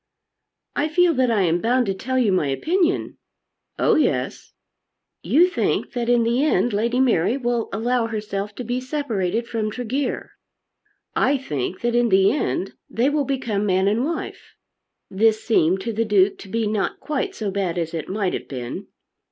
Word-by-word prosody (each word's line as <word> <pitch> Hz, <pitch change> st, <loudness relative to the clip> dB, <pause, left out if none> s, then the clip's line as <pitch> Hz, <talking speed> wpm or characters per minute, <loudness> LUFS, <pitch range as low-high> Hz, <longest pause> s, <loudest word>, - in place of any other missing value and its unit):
"I 290 Hz, -, +1 dB
feel 345 Hz, +2 st, +3 dB
that 255 Hz, -3 st, +2 dB
I 215 Hz, -4 st, +2 dB
am 170 Hz, 0 st, +1 dB
bound 245 Hz, +2 st, +2 dB
to 195 Hz, -, 0 dB
tell 260 Hz, +7 st, -3 dB
you 235 Hz, -6 st, +3 dB
my 180 Hz, -6 st, +1 dB
opinion." 335 Hz, -, 0 dB, 0.6 s
"Oh -, -, +3 dB
yes." -, -, 0 dB, 0.7 s
"You 345 Hz, +5 st, +4 dB
think 365 Hz, -, -1 dB
that 240 Hz, -2 st, -2 dB
in 240 Hz, -1 st, +4 dB
the 235 Hz, +4 st, +1 dB
end 245 Hz, -6 st, +2 dB
Lady 235 Hz, +4 st, +1 dB
Mary 235 Hz, -2 st, +2 dB
will 240 Hz, -3 st, -1 dB
allow 230 Hz, +3 st, 0 dB
herself 210 Hz, -2 st, -4 dB
to 250 Hz, -, -5 dB
be 245 Hz, +2 st, -2 dB
separated 235 Hz, -, -2 dB
from 220 Hz, -2 st, -2 dB
Tregear. 250 Hz, +4 st, -3 dB, 0.8 s
I 280 Hz, -, +3 dB
think 165 Hz, -, -4 dB
that 240 Hz, 0 st, 0 dB
in 240 Hz, 0 st, +3 dB
the 195 Hz, 0 st, +5 dB
end 245 Hz, -7 st, -2 dB, 0.2 s
they 250 Hz, +5 st, +1 dB
will 290 Hz, -1 st, +1 dB
become 230 Hz, -7 st, -1 dB
man 190 Hz, 0 st, +2 dB
and 215 Hz, +4 st, +2 dB
wife." 325 Hz, +3 st, -5 dB, 0.6 s
This 220 Hz, +2 st, +2 dB
seemed 190 Hz, -4 st, +2 dB
to 230 Hz, +3 st, -3 dB
the 225 Hz, +2 st, +1 dB
Duke 205 Hz, -3 st, +2 dB
to 195 Hz, -, -11 dB
be 225 Hz, +2 st, -1 dB
not 210 Hz, -1 st, -1 dB
quite 305 Hz, +6 st, -3 dB
so 210 Hz, -3 st, -3 dB
bad 190 Hz, -3 st, -2 dB
as 165 Hz, -1 st, -2 dB
it 160 Hz, -3 st, -4 dB
might 195 Hz, -1 st, -1 dB
have -, -, -4 dB
been. 125 Hz, -3 st, -6 dB
230 Hz, 175 wpm, -22 LUFS, 195-255 Hz, 0.8 s, the